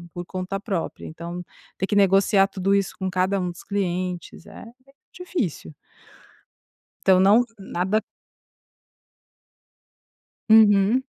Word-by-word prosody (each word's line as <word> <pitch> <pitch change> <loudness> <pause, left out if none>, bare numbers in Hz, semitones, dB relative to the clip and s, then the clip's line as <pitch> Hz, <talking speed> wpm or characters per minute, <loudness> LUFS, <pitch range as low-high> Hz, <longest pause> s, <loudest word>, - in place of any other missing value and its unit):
por 175 0 -5
conta 185 +2 -5
própria, 195 -5 -4
então 170 +2 -7 0.3
ter 190 - -1
que 205 - -2
negociar 195 0 +4
tudo 195 0 -1
isso 200 -1 0
com 190 - -3
cada 185 +2 0
um 180 -1 -2
dos 175 - -13
clientes, 180 -4 -4
é - - -11 0.5
difícil 285 - -4 1.3
então, 190 -1 +6
não 205 +6 +5
nada 195 +2 -1 2.5
Uhum. 215 +2 +5
195 Hz, 105 wpm, -23 LUFS, 180-200 Hz, 2.5 s, então